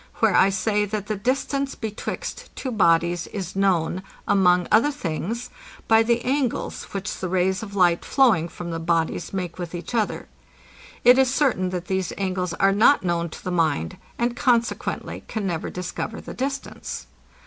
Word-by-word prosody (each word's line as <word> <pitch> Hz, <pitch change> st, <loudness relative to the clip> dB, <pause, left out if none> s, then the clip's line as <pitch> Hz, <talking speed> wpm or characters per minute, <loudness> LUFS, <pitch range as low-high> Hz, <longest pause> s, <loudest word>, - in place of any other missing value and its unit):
where -, -, +3 dB
I 195 Hz, -, +6 dB
say, 210 Hz, +2 st, +1 dB
that 205 Hz, 0 st, -3 dB
the 215 Hz, -, -2 dB
distance 270 Hz, +5 st, -1 dB
betwixt 220 Hz, -2 st, -5 dB
two 260 Hz, -, -4 dB
bodies 170 Hz, -4 st, +2 dB
is 190 Hz, -3 st, -6 dB
known, 185 Hz, -2 st, +1 dB, 0.3 s
among 180 Hz, -3 st, +4 dB
other 225 Hz, +7 st, +5 dB
things, 230 Hz, -, -4 dB, 0.4 s
by 225 Hz, 0 st, +6 dB
the 235 Hz, +1 st, +1 dB
angles, 260 Hz, -2 st, -1 dB
which 195 Hz, -1 st, -5 dB
the 185 Hz, -, -3 dB
rays 185 Hz, +2 st, +1 dB
of 200 Hz, -2 st, -8 dB
light 175 Hz, -3 st, +3 dB
flowing 220 Hz, -, +3 dB
from 170 Hz, 0 st, -7 dB
the 165 Hz, -, -3 dB
bodies 165 Hz, 0 st, 0 dB
make 180 Hz, -2 st, -4 dB
with 175 Hz, -1 st, -5 dB
each 175 Hz, +7 st, -7 dB
other. 220 Hz, -3 st, -1 dB, 0.8 s
It 250 Hz, +2 st, +7 dB
is 260 Hz, -1 st, +4 dB
certain, 260 Hz, -10 st, +1 dB
that 180 Hz, -1 st, -4 dB
these 190 Hz, -1 st, -1 dB
angles 185 Hz, -3 st, -2 dB
are 195 Hz, +2 st, +3 dB
not 220 Hz, +6 st, +5 dB
known 170 Hz, -1 st, 0 dB
to -, -, -11 dB
the 185 Hz, -, -3 dB
mind, 155 Hz, -, 0 dB, 0.2 s
and 240 Hz, 0 st, 0 dB
consequently 240 Hz, -3 st, 0 dB
can 215 Hz, -3 st, -3 dB
never 170 Hz, -4 st, -2 dB
discover 180 Hz, +4 st, -5 dB
the -, -, -8 dB
distance. 275 Hz, +2 st, -4 dB
195 Hz, 170 wpm, -24 LUFS, 175-235 Hz, 0.8 s, It